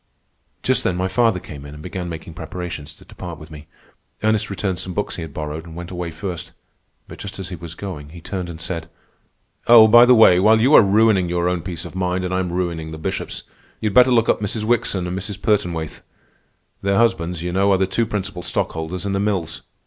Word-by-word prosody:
Just - - +2
then 90 - 0
my 90 +1 0
father 115 -2 +2
came 70 -5 -10
in 70 +1 -10
and 75 - -11
began 90 0 -5
making 80 0 -7
preparations 85 -2 -7
to - - -18
depart 85 -3 -8
with 80 +1 -13
me. 75 -1 -11 0.6
Ernest 110 0 +2
returned 95 -2 -2
some 90 +1 -5
books 105 - -2
he - - -5
had 80 -2 -6
borrowed, 75 +2 -5
and 85 -1 -11
went 85 +1 -7
away 90 -2 -4
first. 85 +1 -6 0.5
But - - -11
just 100 - -7
as 95 -1 -6
he 90 - -5
was 85 -1 -9
going, 85 -8 -7
he 85 +3 -11
turned 90 +1 -5
and 80 -2 -8
said: 85 -1 -5 0.8
"Oh, 115 -2 +9
by 120 +2 +8
the 125 - +7
way, 95 -6 +7
while 110 +3 +5
you 130 +7 +4
are - - +10
ruining 100 -3 +3
your 85 0 0
own 90 -1 0
peace 85 0 -6
of - - -9
mind 90 0 -1
and 90 - -3
I 95 - +1
am 90 -2 -2
ruining 85 -3 -2
the 80 - -7
Bishop's, 80 - -4 0.4
you'd 105 -2 -1
better 125 0 +6
look 115 -2 +3
up - - +2
Mrs. 105 +1 -2
Wickson 110 -5 0
and 90 +1 -3
Mrs. 100 +1 -5
Pertonwaithe. 90 -7 -1 0.8
Their 100 0 +1
husbands, 85 -7 +1
you 90 - -2
know, 100 +2 +3
are 95 - +4
the 95 - +2
two 115 +4 0
principal 100 -4 -4
stockholders 85 +2 -3
in 100 - -1
the 100 - 0
Mills. 95 -6 -2
90 Hz, 225 wpm, -21 LUFS, 85-100 Hz, 0.8 s, are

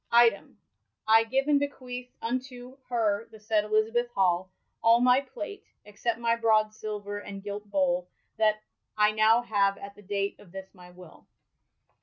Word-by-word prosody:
Item, 235 -3 +3 0.5
I 225 +1 +6
gyve 265 +4 0
and 290 -1 +4
bequeath 250 -3 -5
unto 250 +1 -5
[her] 225 -3 0
the 220 - -14
saied 210 0 +1
Elizabeth 220 +3 +1
Hall, 185 -1 +1 0.3
all 230 +1 +5
my 250 +2 +4
plate, 305 +8 -8 0.2
eoccept 225 +3 -3
iny 235 0 0
brod 215 -1 +3
silver 205 -1 -5
and 200 -1 -9
gilt 205 0 -6
bole^ 180 -3 +1 0.3
that 215 -1 +2 0.3
I 210 0 +4
now 220 +2 +4
have 200 -3 +1
att 200 0 -9
the 205 - -16
date 200 0 -3
of 180 - -17
this 190 0 -9
my 180 -2 -15
will. 180 -2 -16
215 Hz, 160 wpm, -28 LUFS, 200-240 Hz, 0.5 s, I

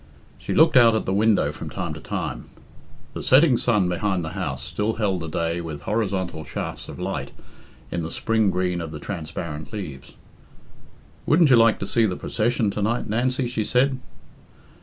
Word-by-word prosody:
She - - -3
looked 160 0 +5
out 115 -3 +7
at 110 - -1
the 95 - -1
window 100 -8 +3
from 75 - -7
time - - -4
to - - -8
time. - - -4 0.7
The - - -5
setting 135 0 +5
sun 105 -6 +2
behind 90 -1 -1
the - - -4
house 75 -8 -4
still 105 +10 -2
held 100 -5 0
the 80 - -5
day 85 +2 -1
with 75 -4 -7
horizontal 95 -6 -2
shafts - - -6
of - - -8
light - - -3 0.6
in 85 - -2
the 80 - -4
spring 110 +2 +1
green 90 -1 -1
of 80 -2 -6
the 75 - -7
transparent 75 -4 -6
leaves. 75 -11 -7 1.1
"Wouldn't 155 -2 +5
you - - +8
like 115 -1 +5
to - - -1
see 115 -2 +2
the 90 - -2
procession 115 0 0
to 105 - -4
night, 115 +4 0
Nancy?" 125 +4 0
she 120 -2 -2
said. 130 +4 +2
100 Hz, 180 wpm, -23 LUFS, 85-115 Hz, 1.1 s, you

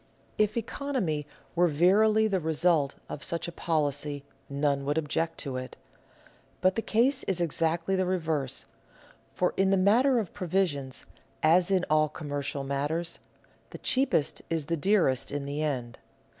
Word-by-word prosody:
If 215 +1 +2
economy 220 - -2 0.3
were 175 +1 +4
verily 210 +8 +4
the 195 -3 +1
result 160 -2 +1
of 140 - -7
such 170 0 -1
a - - -5
policy 145 -3 -1 0.3
none 140 0 0
would 145 +2 -1
object 160 +1 -1
to 135 -4 -4
it. 130 0 -6 0.8
But 185 +1 +3
the 225 - -1
case 245 +6 +2
is 190 -2 0
exactly 170 +2 0
the 185 -1 +1
reverse; 160 -7 -1 0.7
for, 180 - +1
in 195 0 +3
the 195 - +4
matter 240 +8 +4
of 215 -7 -2
provisions, 175 -8 -1 0.4
as 175 +4 +4
in 185 -2 +2
all 155 0 +3
commercial 145 -2 -4
matters, 145 +5 -2 0.5
the - - -8
cheapest 255 - +1
is 165 -3 -1
the 165 +3 -1
dearest 165 - +2
in 145 -1 -3
the 145 +2 -3
end. 125 -6 -3
165 Hz, 150 wpm, -28 LUFS, 145-190 Hz, 0.8 s, were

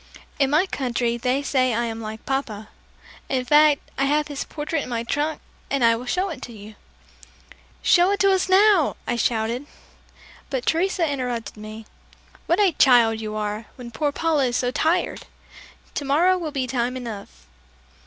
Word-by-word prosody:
"In 275 -2 +3
my 310 +6 +3
country 245 -7 -1
they 250 +4 -1
say 255 -4 +1
I 235 +1 0
am 225 -1 -5
like 220 0 -7
Papa. 220 -6 -3 0.6
In 255 -2 -1
fact, 295 +1 +5 0.2
I 275 - +3
have 295 +2 +1
his 285 -1 -4
portrait 300 0 -3
in - - -7
the 235 -1 -2
trunk 295 +6 -2 0.3
and 275 -3 0
I 230 0 +5
will 245 +2 -7
show 370 +8 0
it 295 -7 -7
to 240 - -8
you." 215 -1 -11 1.1
"Show 355 +1 +5
it 400 0 0
to 395 -1 +5
us 380 0 +1
now!" 385 -4 +4
I - - -1
shouted. 235 +3 -1 0.8
But 260 -3 -3
Teresa 345 0 +1
interrupted 250 -5 -3
me. 215 +1 -9 0.6
"What 340 +4 +2
a 400 -3 +4
child 235 -6 +4
you 215 -1 -5
are, 210 +1 -3
when 245 -2 -9
poor 290 +6 -1
Paula 310 -2 +1
is 245 -1 0
so 245 -1 0
tired! 335 +6 0 0.7
Tomorrow 305 +7 +2
will 340 -4 -3
be 270 -3 -2
time 250 0 -2
enough." 210 - -8
260 Hz, 175 wpm, -23 LUFS, 235-310 Hz, 1.1 s, fact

